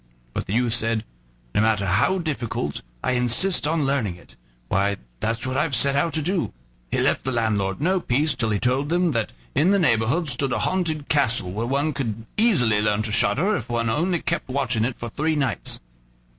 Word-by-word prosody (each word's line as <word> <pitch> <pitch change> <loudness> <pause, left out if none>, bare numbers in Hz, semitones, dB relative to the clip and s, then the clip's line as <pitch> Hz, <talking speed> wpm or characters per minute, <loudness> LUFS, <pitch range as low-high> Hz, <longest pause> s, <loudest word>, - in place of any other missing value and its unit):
But - - -4
the 95 - -3
youth 120 0 +2
said: 115 -1 0 0.5
"No - - +2
matter 110 -2 +2
how 100 - +2
difficult, 150 - -3 0.2
I - - +1
insist 125 +8 +3
on 155 -2 +1
learning 130 -10 0
it; 90 - -18 0.3
why, 100 +6 +1 0.2
that's 115 - -2
what 130 0 -2
I've 145 -5 +1
set 140 +4 +2
out 160 +4 +1
to 155 - 0
do." 180 +1 -1 0.4
He - - -1
left - - +1
the 130 - -2
landlord 105 -5 0
no 185 +6 +2
peace 150 -1 +1
till 120 -4 -1
he 105 - +1
told 130 +7 0
him 175 -1 +2
that 115 -5 -1 0.2
in 165 - +3
the 200 - +4
neighborhood 150 - +2
stood 130 0 +1
a - - 0
haunted 160 -6 -1
castle, 120 -10 +2
where 110 +5 -3
one 140 +4 0
could 115 -5 -4
easily 125 - +3
learn 105 0 +1
to 110 - -3
shudder 185 - +2
if 120 - -5
one 115 -1 0
only 170 +6 0
kept 170 -5 -2
watch 130 -2 -1
in 110 0 +1
it 125 0 -3
for 120 - -6
three 155 +4 0
nights. 145 -3 -1
130 Hz, 205 wpm, -23 LUFS, 110-155 Hz, 0.5 s, the